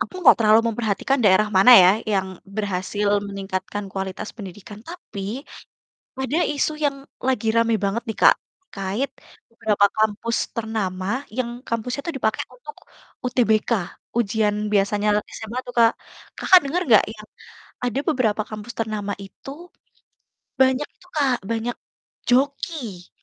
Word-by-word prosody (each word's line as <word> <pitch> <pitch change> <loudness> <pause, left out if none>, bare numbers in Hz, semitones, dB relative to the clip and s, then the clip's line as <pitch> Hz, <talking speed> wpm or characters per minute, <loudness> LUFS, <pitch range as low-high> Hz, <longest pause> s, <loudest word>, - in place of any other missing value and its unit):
aku - - -3
gak - - +9
terlalu 215 0 +6
memperhatikan 225 +4 0
daerah 205 +2 +5
mana 195 +6 +7
ya, 180 - +7 0.2
yang 190 -1 +1 0.3
berhasil 205 0 -1 0.2
meningkatkan 195 +1 -4
kualitas 190 +1 -4
pendidikan. 205 0 -10
Tapi 250 - -6 0.8
ada 265 +4 -1 0.2
isu 300 +2 0
yang 280 -1 +1 0.3
lagi 255 -3 0
rame 230 0 +3
banget 210 +5 -1
nih, 220 - -4
Kak, - - +8 0.4
terkait 200 +8 -2 0.4
beberapa 215 -3 +2
kampus 220 +2 0 0.2
ternama 215 -5 -3 0.3
yang 250 -2 0 0.2
kampusnya 240 +4 -2
itu 335 - -2
dipake 220 -3 0 0.2
untuk 485 -3 -11 0.5
UTBK, 225 -4 +2 0.5
ujian 210 -1 +1 0.2
biasanya 205 +1 +2 0.3
SMA 220 +2 -6
tuh, 245 - -7
Kak. 230 -1 +6 0.5
Kakak, 370 -1 +7
denger 340 +6 -1
gak 215 - +8
ya, 220 - -15 0.6
ada 245 +2 0
beberapa 235 -9 +1
kampus 215 +2 -7
ternama 215 -2 -2
itu 195 +7 -13 1.1
banyak 260 +2 +4
itu, - - -22
Kak, 275 -3 +3 0.2
banyak 230 +1 -2 0.5
joki? 255 - -1
220 Hz, 130 wpm, -23 LUFS, 205-250 Hz, 1.1 s, gak